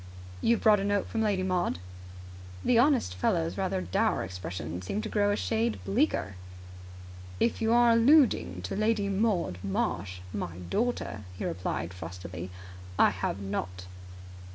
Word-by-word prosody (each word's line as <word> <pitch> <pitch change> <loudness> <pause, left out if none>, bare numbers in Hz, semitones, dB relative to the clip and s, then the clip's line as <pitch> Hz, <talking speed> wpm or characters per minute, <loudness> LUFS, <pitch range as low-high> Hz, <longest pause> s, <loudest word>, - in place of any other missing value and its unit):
"You 235 - +4
have - - -6
brought 210 -2 +6
a - - -2
note 205 0 0
from 225 - -1
Lady 205 -4 +1
Maud?" 180 - 0 0.9
The 240 -2 +5
honest 260 - +3
fellow's 85 -1 0
rather 95 - -1
dour 90 0 +1
expression 90 -2 -5
seemed 195 - -3
to 220 - -4
grow 205 -1 +2
a - - +2
shade 225 +2 0
bleaker. 195 - 0 1.0
"If 235 - +1
you 225 0 +2
are 240 0 +6
alluding 230 - +4
to 90 - -3
Lady 215 -1 +1
Maud 195 - 0
Marsh, 95 -1 -2
my 85 -3 -4
daughter," 235 - -1 0.2
he - - -4
replied 90 -1 -3
frostily, 90 0 -7 0.5
"I - - +6
have 95 - -3
not!" 95 -2 -4
185 Hz, 150 wpm, -29 LUFS, -, 1.0 s, brought